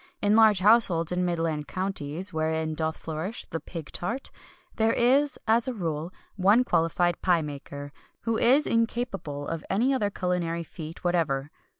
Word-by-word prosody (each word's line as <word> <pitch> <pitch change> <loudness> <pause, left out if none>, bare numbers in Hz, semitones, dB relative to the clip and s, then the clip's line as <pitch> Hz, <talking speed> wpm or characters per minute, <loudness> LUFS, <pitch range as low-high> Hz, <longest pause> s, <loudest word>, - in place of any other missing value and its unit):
In 205 +1 +3
large 215 -4 +5
households 190 -6 +4
in 180 - -1
the 180 - +1
midland 165 -4 -1
counties 185 0 -2
(wherein 160 0 -1
doth 160 0 -2
flourish 165 +8 -5
the 165 - -5
pig 165 -3 -8
tart) 230 +10 -3 0.5
there 220 0 +3
is, 275 +4 +3
as 230 +2 +3
a 255 - -2
rule, 165 -3 -3 0.2
but 190 - -7
one 210 +6 +6
qualified 175 -4 +1
pie 175 -3 +3
maker 145 -1 -7 0.3
who 230 -1 -1
is 260 +7 +4
incapable 225 - -1
of 165 -1 -4
any 240 +8 +2
other 210 -6 +1
culinary 175 -3 -2
feat 165 0 -9
whatever. 150 -6 0
180 Hz, 165 wpm, -27 LUFS, 160-220 Hz, 0.5 s, one